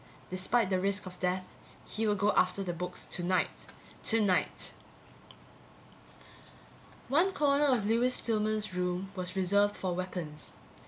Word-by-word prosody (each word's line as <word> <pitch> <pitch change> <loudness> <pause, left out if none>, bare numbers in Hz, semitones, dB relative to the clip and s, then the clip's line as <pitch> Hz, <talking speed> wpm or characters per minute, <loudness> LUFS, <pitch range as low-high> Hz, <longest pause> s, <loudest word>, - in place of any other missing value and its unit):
Despite 190 +3 +1
the 185 - +2
risk 200 +1 0
of 180 -1 -10
death, 185 0 0 0.4
he 220 +1 -2
would 205 -1 +2
go 205 +2 +3
after 185 +1 +2
the 175 -2 -3
books 180 +1 -4
tonight. 180 +1 -1 0.3
Tonight. 205 -5 +2 2.4
One 330 +9 +3
corner 290 -3 +3
of 250 -7 +2
Lewis 235 +4 +3
Stillman's 215 -2 0
room 180 +1 -2
was 185 0 -4
reserved 200 +2 +2
for 185 -2 -2
weapons. 175 -4 -5
195 Hz, 125 wpm, -31 LUFS, 180-215 Hz, 2.4 s, go